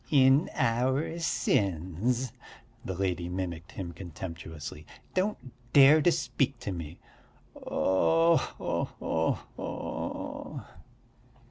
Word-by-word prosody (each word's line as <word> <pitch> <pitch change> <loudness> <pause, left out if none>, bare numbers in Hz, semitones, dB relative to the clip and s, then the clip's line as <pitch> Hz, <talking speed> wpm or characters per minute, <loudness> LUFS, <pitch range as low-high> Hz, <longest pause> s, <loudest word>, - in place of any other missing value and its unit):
"In 135 +2 +5
our 130 +8 +1
sins," 110 - 0 0.5
the 95 - -4
lady 90 -2 -1
mimicked 90 -2 -4
him 90 -3 -5
contemptuously. 80 -3 -7 0.3
"Don't 195 +3 +1 0.4
dare 145 +3 +8
to 175 - +5
speak 140 -5 0
to 120 - -3
me." 85 -2 -6 0.6
"Oh 165 - +3
ho - - -2
ho 80 0 0 0.2
ho!" - - -5
100 Hz, 95 wpm, -29 LUFS, 85-140 Hz, 0.6 s, dare